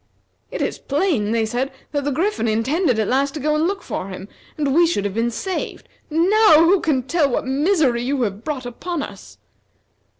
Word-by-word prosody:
"It - - -3
is - - -3
plain," 280 - 0
they 225 -1 +1
said, 245 +5 -2 0.2
"that 285 -2 -2
the 290 - 0
Griffin 350 - 0
intended 250 - +1
at 215 -2 0
last 275 +3 +1
to - - -3
go 300 +2 0
and 310 +2 +2
look 390 -1 -3
for 185 - -4
him, 190 0 -8 0.3
and 285 -3 0
we 340 +3 +5
should 205 -12 -1
have 200 - -2
been 230 +2 0
saved. 365 - -4 0.2
Now 335 +1 +5
who 375 +3 +4
can 275 -6 +1
tell 295 +1 +1
what 250 - -1
misery 275 -2 +2
you 260 +1 0
have 205 0 -3
brought 280 -5 -4
upon 295 +6 -4
us." - - -11
280 Hz, 200 wpm, -21 LUFS, 235-330 Hz, 0.3 s, we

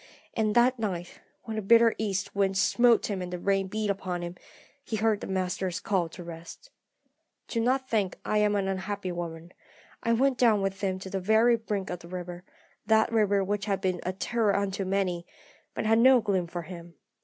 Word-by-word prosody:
And 215 -2 0
that 245 +1 +4
night, 180 -5 -4 0.2
when 220 -1 -5
the - - -1
bitter 230 +2 +5
east 200 -3 -2
wind 195 -1 +1
smote 235 +4 +4
him 195 -3 -3
and 180 0 -5
the 180 - -3
rain 195 +1 0
beat 210 +1 -1
upon 185 -3 -4
him, 175 0 -5 0.5
he 225 - -4
heard 215 -1 +1
the - - -5
Master's 185 -1 -2
call 190 -4 0
to 175 +2 -10
rest. 170 - -10 0.8
"Do 230 - -2
not 260 +3 +1
think 205 -6 0
that - - -17
I 215 - +2
am 210 0 +2
an 195 -1 0
unhappy 195 0 -3
woman. 170 0 -6 0.5
I 230 - +1
went 260 +2 +2
down 220 -5 +4
with 195 0 -2
him 190 -2 0
to 190 0 -8
the 195 - -1
very 220 +5 +4
brink 210 -4 -3
of 180 - -4
the 170 - -13
river 180 0 -7 0.4
that 220 +1 +4
river 205 -3 +2
which 205 +1 -2
has 200 -2 0
been 185 -2 -1
a 185 - -2
terror 210 +2 0
unto 200 0 -1
many, 185 -2 -1 0.5
but - - -2
had 225 +1 +4
no 260 +1 +7
gloom 190 -5 0
for 170 0 -5
him. 170 0 -10
195 Hz, 205 wpm, -28 LUFS, 185-220 Hz, 0.8 s, no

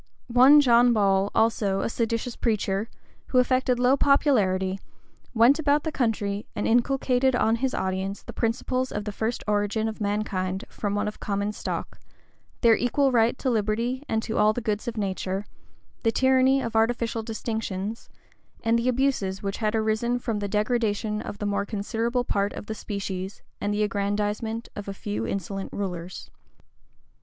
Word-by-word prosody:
One 270 +4 +8
John 240 -2 +5
Ball, 195 -2 +2
also, 210 -3 +2
a - - -1
seditious 230 +1 -2
preacher, 210 -2 -1 0.4
who 255 - 0
affected 255 0 +3
low 250 +2 +4
popularity, 195 -10 +2 0.6
went 240 +7 +5
about 290 -1 +2
the 315 - -2
country 215 -6 -1
and - - -1
inculcated 255 +1 +2
on 225 -1 +2
his 260 +2 -1
audience 190 +1 -2
the - - -9
principles 255 +3 -1
of 205 0 -4
the 210 - -3
first 220 +4 -3
origin 210 +1 0
of 220 0 -6
mankind 200 -2 -2
from 205 -1 -3
one 205 +1 0
common 200 0 -1
stock, - - -5 0.6
their 230 -2 +6
equal 270 +4 +1
right 235 0 +3
to 260 - -1
liberty 230 +4 0
and 220 0 0
to 220 - -2
all 210 +1 +5
the 245 - -3
goods 215 -2 -2
of 230 -1 -4
nature, 195 -1 -2 0.6
the 225 - +2
tyranny 260 +2 +3
of 230 -1 -4
artificial 230 0 +1
distinctions, 220 -2 -4 0.5
and 230 +1 +3
the 240 +2 +1
abuses 235 -7 0
which 195 0 -2
had 215 0 0
arisen 220 +2 +1
from 230 -3 -2
the 205 - -2
degradation 215 0 0
of 205 - -7
the 205 - -4
more 200 0 0
considerable 230 +4 -1
part 200 -3 -1
of - - -7
the 220 - -4
species, 195 -2 -5 0.2
and 205 - 0
the 210 +1 +1
aggrandizement 210 +3 -2
of 205 -1 -7
a 200 - -5
few 110 - -3
insolent 195 0 -4
rulers. 180 -3 -5
220 Hz, 165 wpm, -26 LUFS, 200-240 Hz, 0.6 s, One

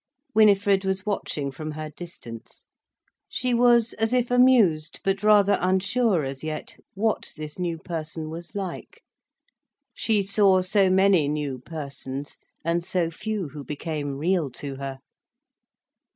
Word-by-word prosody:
Winifred 200 -2 +4
was 190 +1 -2
watching 150 -9 -2
from 155 +3 -6
her 155 0 -6
distance. 145 -9 -11 0.7
She 250 0 -1
was 235 -1 +4
as 225 +2 -1
if 245 -1 +1
amused, 225 -12 +4
but 195 0 0
rather 205 -1 +5
unsure 190 +1 +2
as 135 +1 -6
yet 155 -1 -5 0.2
what 215 +2 0
this 155 +2 -7
new 170 -2 -1
person 160 -1 -5
was 170 +3 -9
like. 190 -3 -6 0.9
She 215 -3 +1
saw 195 -1 +4
so 190 +1 +3
many 190 -4 +4
new 145 -3 -2
persons, 140 -1 -7 0.3
and 170 +1 +1
so 170 -2 0
few 205 -1 -4
who 145 0 -8
became 145 -1 -4
real 165 0 +1
to 140 0 -5
her. 135 -1 -5
175 Hz, 135 wpm, -25 LUFS, 155-205 Hz, 0.9 s, rather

